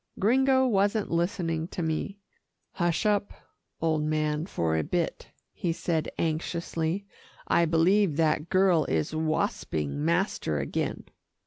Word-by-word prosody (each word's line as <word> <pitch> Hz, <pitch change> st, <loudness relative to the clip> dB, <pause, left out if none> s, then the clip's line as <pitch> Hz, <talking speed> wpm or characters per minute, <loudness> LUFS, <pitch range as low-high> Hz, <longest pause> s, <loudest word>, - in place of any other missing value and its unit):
Gringo 260 Hz, +5 st, +4 dB
wasn't 205 Hz, -2 st, +1 dB
listening 170 Hz, -2 st, -1 dB
to 175 Hz, -, -4 dB
me. 160 Hz, +5 st, -2 dB, 0.5 s
"Hush 175 Hz, +3 st, 0 dB
up, 205 Hz, -1 st, +1 dB, 0.5 s
old 160 Hz, -1 st, +1 dB
man, 155 Hz, +1 st, 0 dB
for 80 Hz, -, -1 dB
a 80 Hz, -, +1 dB
bit," 175 Hz, -2 st, -2 dB, 0.3 s
he 175 Hz, -, -2 dB
said 160 Hz, -1 st, -1 dB
anxiously. 165 Hz, +3 st, -2 dB, 0.4 s
"I 170 Hz, -, +4 dB
believe 165 Hz, +1 st, +3 dB
that 160 Hz, 0 st, +1 dB
girl 185 Hz, -4 st, +4 dB
is 80 Hz, -, -1 dB
wasping 145 Hz, -, -1 dB
master 170 Hz, -, 0 dB
again." 70 Hz, -1 st, -2 dB
165 Hz, 120 wpm, -27 LUFS, 155-195 Hz, 0.5 s, Gringo